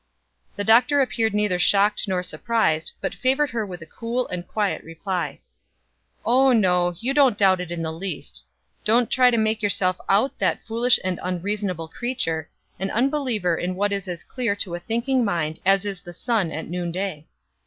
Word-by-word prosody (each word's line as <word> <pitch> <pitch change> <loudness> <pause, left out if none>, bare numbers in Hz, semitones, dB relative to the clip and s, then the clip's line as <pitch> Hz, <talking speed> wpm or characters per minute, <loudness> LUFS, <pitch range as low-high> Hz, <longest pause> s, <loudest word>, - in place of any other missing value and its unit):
The 205 - -2
Doctor 245 +7 +5
appeared 225 -5 +1
neither 210 -4 +1
shocked 205 +4 +3
nor 185 -2 -1
surprised, 180 -6 0
but - - -2
favored 270 +2 +1
her 230 -1 -1
with 175 -3 -8
a - - -11
cool 235 +8 -3
and 180 -1 -5
quiet 210 -2 -1
reply: 175 +3 -4 0.8
"Oh, 260 +2 +4
no, 180 -5 +2
you 260 +4 -1
don't 270 -7 +4
doubt 190 -2 +4
it 180 - -6
in 170 -1 -3
the 160 0 -3
least. 185 +4 -5 0.4
Don't 230 +2 +3
try 255 -1 +5
to 235 - +1
make 220 0 +1
yourself 185 -3 +1
out 210 +8 +2
that - - 0
foolish 235 +2 +3
and 185 -1 -2
unreasonable 185 -2 -3
creature 165 - -3 0.3
an 195 +1 -2
unbeliever 240 - +1
in 180 +2 -3
what 205 +2 0
is 200 -1 -3
as 175 -2 -5
clear 240 -5 -2
to 195 -3 -4
a 175 - -3
thinking 235 +7 0
mind 165 -7 -1
as 195 +1 +4
is 195 -3 -4
the 175 -1 -10
sun 210 -3 0
at 155 +1 -5
noonday. 175 -1 -4
200 Hz, 180 wpm, -23 LUFS, 180-235 Hz, 0.8 s, Doctor